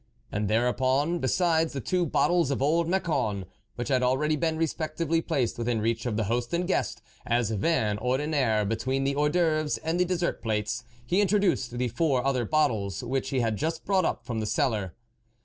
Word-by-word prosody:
" 115 -2 -36
And 105 0 -1
thereupon, 130 - +1
besides 165 +3 +1
the 140 - -3
two 175 +6 0
bottles 175 +1 +2
of 140 - -1
old 160 +5 +2
Macon, 155 - 0 0.3
which 120 - -4
had 130 -2 +2
already 135 +5 +2
been 160 +1 -1
respectively 165 0 -1
placed 125 -7 -1
within 120 -1 0
reach 115 +2 -1
of 110 -3 -1
the 110 - +1
host 120 +7 -1
and 175 +1 0
guest, 185 - -1 0.2
as 120 -2 0
vin 105 -2 +1
ordinaire, 130 -4 +1
between 130 +6 -1
the 140 0 0
Hors 150 +1 +2
d'oeuvres 155 -2 +1
and 165 +2 -1
the 180 - +4
des 180 0 -1
sert 170 0 -2
plates, 110 +1 -2 0.2
he 180 +11 +2
introduced 195 - +1
the 125 0 0
four 130 +1 0
other 130 -3 +1
bottles 110 - 0
which 130 +2 -2
he 130 -2 0
had 110 -2 0
just 160 +4 -3
brought 190 -1 +2
up 120 - -2
from 120 -3 -3
the 110 - -2
cellar. 110 - 0
135 Hz, 195 wpm, -27 LUFS, 115-160 Hz, 0.3 s, the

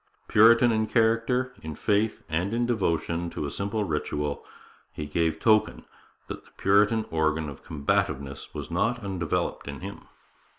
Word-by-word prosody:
Puritan 115 +3 +6
in 110 -1 +1
character, 115 +3 +1
in 80 -1 -6
faith, 105 +5 0
and 90 +7 -1
in 120 0 +1
devotion 85 -7 -1
to 75 - -4
a 70 - -4
simple 100 +2 -2
ritual, 75 -3 -2 0.5
he 75 - -6
gave 80 +2 0
token 110 -1 +2 0.4
that - - -7
the - - -21
Puritan 105 +3 +3
organ 80 -1 0
of 70 - -9
combativeness 70 -2 -2
was - - -7
not 115 +2 0
undeveloped 90 -8 -2
in 70 +1 -6
him. 100 +2 -8
100 Hz, 145 wpm, -26 LUFS, 80-110 Hz, 0.5 s, Puritan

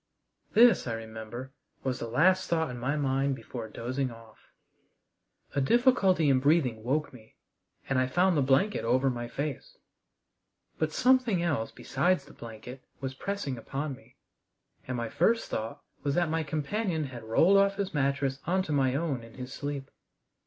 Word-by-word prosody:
This, 235 - +6
I 115 - -1
remember, 115 +3 -7 0.3
was 130 -1 -1
the 115 - -4
last 180 +10 +3
thought 160 -4 +1
in 120 - -6
my 135 +5 -1
mind 135 -1 +1
before 120 -3 -7
dozing 130 +4 -3
off. 115 -1 -15 1.1
A 140 - +1
difficulty 195 - +4
in 135 -2 +4
breathing 130 -6 +2
woke 145 +5 -1
me, 110 -3 -16 0.5
and 135 -1 +1
I 130 - +2
found 180 +7 +3
the 145 - +3
blanket 135 +11 +2
over 130 +3 +2
my 120 -1 -4
face. 140 +2 -5 1.0
But 155 -1 0
something 250 -5 +3
else 145 -10 0
besides 180 -5 0
the 145 - -15
blanket 115 +3 -10 0.2
was 135 0 -4
pressing 145 -5 -4
upon 140 +5 -4
me, 135 - -16 0.7
and 125 -1 -2
my 115 0 -2
first 225 - +1
thought 115 +7 -4 0.2
was 140 -1 -1
that 175 -3 +1
my 165 0 +1
companion 160 +4 -2
had 125 -5 -7
rolled 165 - +4
off 200 0 +4
his 195 -1 -3
mattress 140 -1 0
on 185 +2 +2
to 160 - -5
my 135 -3 +2
own 145 -5 -1
in 115 0 -13
his 125 0 -7
sleep. 140 -2 -5
140 Hz, 165 wpm, -29 LUFS, 125-170 Hz, 1.1 s, This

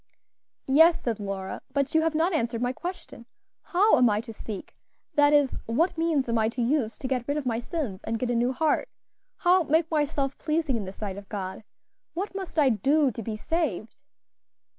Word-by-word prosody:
"Yes," 320 +5 +5
said 230 -3 -1
Lora, 195 -2 -5
"but 280 -1 0
you 320 - +4
have 320 -1 0
not 335 +4 +2
answered 235 -6 0
my 245 +1 0
question; 350 -8 -8 0.3
how 390 - +3
am 245 -2 +5
I 210 0 +1
to 230 -1 -9
seek? 210 -2 -8 0.4
that 290 0 +5
is, 290 -3 +3
what 315 +11 +1
means 325 -5 +1
am 230 -1 +1
I 220 0 +2
to 245 +2 -4
use 235 -4 0
to 260 - -4
get 255 -2 -2
rid 285 +1 0
of 295 - -3
my 230 -2 0
sins, 240 - -4
and 225 - -2
get 245 +1 -1
a - - 0
new 240 +2 +2
heart? 310 - 0 0.5
how 365 +1 +4
make 320 +1 +1
myself 290 -3 0
pleasing 310 -4 0
in 215 -4 -3
the 190 - -6
sight 200 -1 -6
of 200 - -15
God? 190 0 -5 0.5
what 390 +4 -3
must 385 -3 -6
I 290 -4 +5
do 275 +6 +2
to 230 - -6
be 220 0 -4
saved?" 265 - -2
265 Hz, 205 wpm, -26 LUFS, 225-320 Hz, 0.5 s, Yes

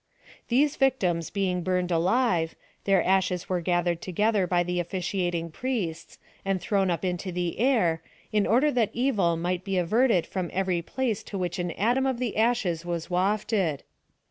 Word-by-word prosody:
These 280 +5 +2
victims 185 - +1
being 185 -3 -1
burned 180 0 0
alive, 175 -1 +1 0.3
their 195 -2 +3
ashes 185 -1 +1
were 180 -2 -1
gathered 175 -1 0
together 205 +1 +1
by.the 180 0 +1
offi 175 +2 -5
ciating 175 -3 -2
priests, 210 -11 -3 0.3
and 195 -1 0
thrown 195 +2 +1
up 175 +2 -1
into 180 +1 -2
the 175 0 -3
air, 215 -11 +2 0.3
in 210 -1 +2
order 260 +7 +3
that 235 -5 +1
evil 210 -10 +1
might 175 +2 -2
be 195 -1 -2
averted 200 +2 +3
from 185 -3 -3
every 185 -2 0
place 225 +3 -2
to 200 - -5
which 180 -1 -2
an 175 0 -1
atom 245 +6 +1
of 260 -2 0
the 245 -2 -2
ashes 220 -7 +1
was 175 0 -4
wafted. 190 - 0
185 Hz, 165 wpm, -27 LUFS, 175-220 Hz, 0.3 s, their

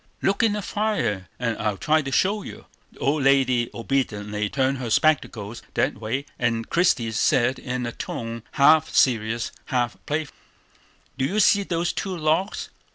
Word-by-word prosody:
"Look 195 - +2
in 225 -2 +3
the 210 -1 -3
fire, 200 - -1
and 115 -2 -1
I'll 105 -2 -1
try 155 +7 +2
to 135 -2 -5
show 200 +9 +2
you." - - -10 0.3
The - - -21
old 145 +2 0
lady 130 -3 +3
obediently 105 -5 -2
turned 135 +1 0
her 125 -3 -4
spectacles 115 -6 +1
that - - +2
way; 120 +6 -3
and 115 -2 0
Christie 135 -10 +2
said 120 +3 +2
in 125 -1 -3
a 120 - -3
tone 115 0 -5
half 155 +2 +5
serious, 115 -2 +2
half 125 -4 -1
playful: 155 0 -2 0.8
"Do 130 - +2
you 200 +9 0
see 200 0 +5
those 175 -3 -1
two 190 -2 -3
logs? 160 +5 0
130 Hz, 160 wpm, -24 LUFS, 115-160 Hz, 0.8 s, half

